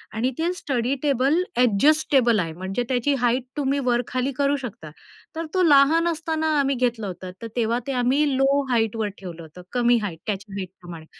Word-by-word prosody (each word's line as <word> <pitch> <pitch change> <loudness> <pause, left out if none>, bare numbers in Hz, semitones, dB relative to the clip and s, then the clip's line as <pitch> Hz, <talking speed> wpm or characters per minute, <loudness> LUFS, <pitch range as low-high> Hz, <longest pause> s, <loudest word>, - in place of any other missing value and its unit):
आणि 245 +4 +1
ते 335 +2 0
study 260 -6 -1
table 275 0 +2 0.2
adjustable 250 0 +3
आहे 165 -2 -2
म्हणजे 190 +7 -3
त्याची 260 +3 +1
हाईट 245 +1 +1
तुम्ही 280 0 0
वर-खाली 250 +2 0
करू 280 0 +2
शकता. 215 - -8 0.5
तर 330 0 -3
तो 370 - +2
लहान 315 +2 +5
असताना 320 -1 -1
आम्ही 275 0 +1
घेतलं 240 -4 -1
होतं 180 0 -7
तर 230 - -5
तेव्हा 235 0 +1
ते - - -1
आम्ही 265 +5 +2
लो 275 +1 +3
हाईटवर 225 -2 0
ठेवलं 175 -3 -8
होतं, 160 +3 -12
कमी 240 -1 +3
हाईट 165 -5 -5
त्या 210 - +1 0.2
हाईट 190 -3 -4
प्रमाणे 170 -2 -10
245 Hz, 175 wpm, -23 LUFS, 210-280 Hz, 0.5 s, लहान